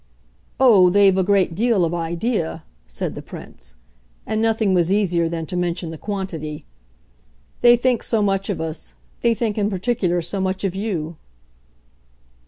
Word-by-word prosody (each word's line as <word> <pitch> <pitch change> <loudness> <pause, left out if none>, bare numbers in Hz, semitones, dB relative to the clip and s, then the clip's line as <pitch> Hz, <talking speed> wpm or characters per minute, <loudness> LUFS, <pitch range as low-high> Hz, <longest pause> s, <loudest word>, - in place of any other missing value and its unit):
"Oh, 210 -9 +6
they've 195 0 +5
a 190 - +2
great 190 -2 +2
deal 215 -1 +2
of 165 - -2
idea," 170 0 -2 0.2
said - - -4
the - - -7
Prince. - - -10 0.5
And 220 0 -1
nothing 225 -3 +2
was 175 -1 +2
easier 175 -5 +1
than 165 -1 -4
to 180 - -6
mention 175 -1 -2
the 160 - -7
quantity. 165 -7 -5 1.0
"They 240 0 +7
think 245 -1 +1
so 220 -3 +1
much 195 0 0
of 200 - -2
us. 160 -1 -5 0.3
They 235 -1 +3
think 220 -2 -1
in 205 0 +1
particular 185 -3 0
so 190 +4 -2
much 190 +1 -2
of 195 -3 0
you." 175 -6 -3
190 Hz, 160 wpm, -21 LUFS, 170-210 Hz, 1.0 s, They